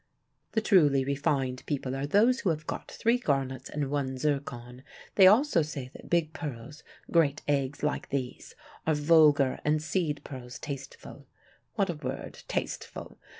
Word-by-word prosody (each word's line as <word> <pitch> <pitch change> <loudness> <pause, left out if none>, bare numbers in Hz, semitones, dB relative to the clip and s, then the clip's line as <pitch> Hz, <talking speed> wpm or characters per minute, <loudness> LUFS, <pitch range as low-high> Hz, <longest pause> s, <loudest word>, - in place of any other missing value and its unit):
The 220 - +2
truly 150 - +4
refined 135 -2 -1
people 135 -3 -2
are 135 +1 -2
those 230 - +4
who 190 - 0
have 155 -2 -2
got - - -5
three 235 +2 +1
garnets 135 - -1
and 145 -2 -3
one 135 -2 -1
zircon. 130 -4 -3 0.3
They 190 -2 +7
also 215 - +5
say 140 -4 -5
that - - -12
big 165 -2 +1
pearls, 145 -2 -7 0.3
great 150 -4 +2
eggs 140 -1 -1
like 150 - -1
these, 130 -3 -4 0.3
are 160 - +3
vulgar 150 -3 +4
and 150 +1 +2
seed 155 -2 -1
pearls 125 -3 -8
tasteful. 140 -2 -8 0.5
What - - +1
a - - -4
word, - - -6
'tasteful'! - - -5
145 Hz, 150 wpm, -29 LUFS, 135-160 Hz, 0.5 s, They